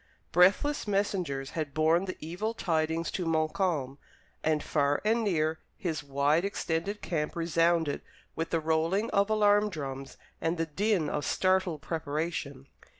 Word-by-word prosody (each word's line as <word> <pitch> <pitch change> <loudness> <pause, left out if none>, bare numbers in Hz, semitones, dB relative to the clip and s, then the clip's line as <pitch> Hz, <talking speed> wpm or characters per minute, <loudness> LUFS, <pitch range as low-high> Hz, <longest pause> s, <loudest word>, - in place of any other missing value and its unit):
Breathless 200 - +4
messengers 180 -9 -1
had 155 -4 -4
borne 160 +4 +3
the 185 - -5
evil 195 +8 -3
tidings 160 -3 0
to 180 - -2
Montcalm, 155 -3 0 0.4
and 155 -1 +1
far 145 -1 +1
and 225 +2 +2
near 160 -5 +1 0.2
his 165 -7 -2
wide 145 +4 +2
extended 195 0 -2
camp 150 -3 -2
resounded 165 -2 +1 0.3
with 165 - -2
the 165 - +1
rolling 165 +7 +1
of 200 0 +2
alarm 210 -1 +4
drums 135 -6 -6 0.2
and 165 +2 0
the 165 - 0
din 185 +1 0
of 150 - -2
startled 185 -4 +1
preparation. 150 -3 -3
165 Hz, 140 wpm, -29 LUFS, 155-195 Hz, 0.4 s, Breathless